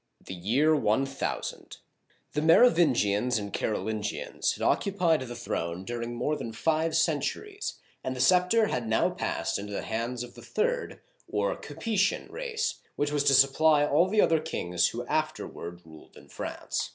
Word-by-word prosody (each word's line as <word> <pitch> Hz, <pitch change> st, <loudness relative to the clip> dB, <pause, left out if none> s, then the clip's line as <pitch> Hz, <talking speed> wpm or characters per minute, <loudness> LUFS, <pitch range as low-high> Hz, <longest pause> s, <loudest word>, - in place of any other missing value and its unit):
THE -, -, -6 dB
YEAR 125 Hz, -, +2 dB
ONE 130 Hz, -1 st, +2 dB
THOUSAND 135 Hz, 0 st, -5 dB, 0.6 s
THE 150 Hz, -, 0 dB
Merovingians 130 Hz, -, +4 dB
and 100 Hz, -2 st, -5 dB
Carolingians 110 Hz, -1 st, -2 dB
had -, -, -6 dB
occupied 180 Hz, -6 st, +2 dB
the 120 Hz, -2 st, -6 dB
throne 90 Hz, -6 st, -4 dB
during 120 Hz, +1 st, -4 dB
more 135 Hz, +6 st, 0 dB
than 115 Hz, -6 st, -6 dB
five 160 Hz, +6 st, 0 dB
centuries, 180 Hz, -, -1 dB, 0.3 s
and 130 Hz, -, -3 dB
the -, -, -7 dB
scepter 180 Hz, -, +4 dB
had 125 Hz, -, -2 dB
now 110 Hz, -, +2 dB
passed -, -, -2 dB
into 105 Hz, +1 st, -6 dB
the -, -, -3 dB
hands 115 Hz, +2 st, -3 dB
of 125 Hz, -, -10 dB
the -, -, -13 dB
third, 485 Hz, +2 st, -2 dB, 0.3 s
or -, -, 0 dB
Ca -, -, -10 dB
pe'tian 205 Hz, -3 st, 0 dB
race, 475 Hz, -2 st, -3 dB, 0.2 s
which 145 Hz, 0 st, -1 dB
was 145 Hz, -1 st, +1 dB
to 140 Hz, -1 st, +6 dB
supply 145 Hz, +3 st, +5 dB
all 155 Hz, +5 st, +3 dB
the 210 Hz, +1 st, +4 dB
other 165 Hz, -1 st, +3 dB
kings 90 Hz, -, 0 dB
who -, -, -5 dB
afterward 85 Hz, +1 st, -3 dB
ruled 80 Hz, -1 st, -15 dB
in -, -, -16 dB
France. -, -, -4 dB
140 Hz, 165 wpm, -28 LUFS, 110-170 Hz, 0.6 s, to